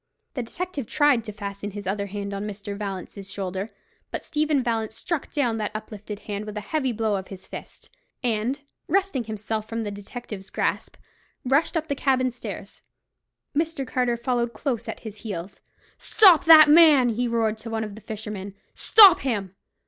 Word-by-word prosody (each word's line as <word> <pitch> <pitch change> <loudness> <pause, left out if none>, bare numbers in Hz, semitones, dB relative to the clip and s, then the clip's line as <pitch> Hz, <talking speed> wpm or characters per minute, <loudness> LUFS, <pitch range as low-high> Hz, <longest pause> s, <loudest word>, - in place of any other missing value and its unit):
The 255 - -3
detective 290 - -5
tried 290 -5 +3
to 210 - -5
fasten 200 0 -6
his 205 0 -8
other 200 +1 -2
hand 200 0 -5
on 200 +1 -4
Mr. 200 0 -6
Vallance's 195 -1 -6
shoulder; 190 +1 -4 0.4
but - - -5
Stephen 300 -3 0
Vallance 225 -2 -2
struck 335 +2 -3
down 245 -7 0
that 210 -1 -2
uplifted 210 -1 -7
hand 205 0 -5
with 210 0 -7
a - - -3
heavy 265 +3 -1
blow 220 -2 0
of 190 - -7
his 190 -1 -10
fist, - - -11 0.3
and, 240 +4 0 0.3
wresting 375 -11 0
himself 215 0 -4
from 230 0 -3
the 205 - -4
detective's 205 -1 -8
grasp, - - -2 0.5
rushed 280 +6 +2
up 315 0 -2
the 285 - 0
cabin 260 -2 +1
stairs. 245 - -8 0.7
Mr. 315 -2 -1
Carter 250 -2 0
followed 235 0 -1
close 235 0 -3
at - - -6
his 215 -2 -8
heels. 200 -3 -7 0.4
"Stop 375 -7 +6
that 315 -2 +10
man!" 295 -5 +7
he 240 +2 -1
roared 225 -2 0
to 230 - -8
one 225 -1 -2
of 210 -2 -6
the 215 - -11
fishermen; 210 -3 -7 0.2
"stop 400 -6 +8
him!" 205 -8 -2
225 Hz, 175 wpm, -25 LUFS, 205-270 Hz, 0.7 s, that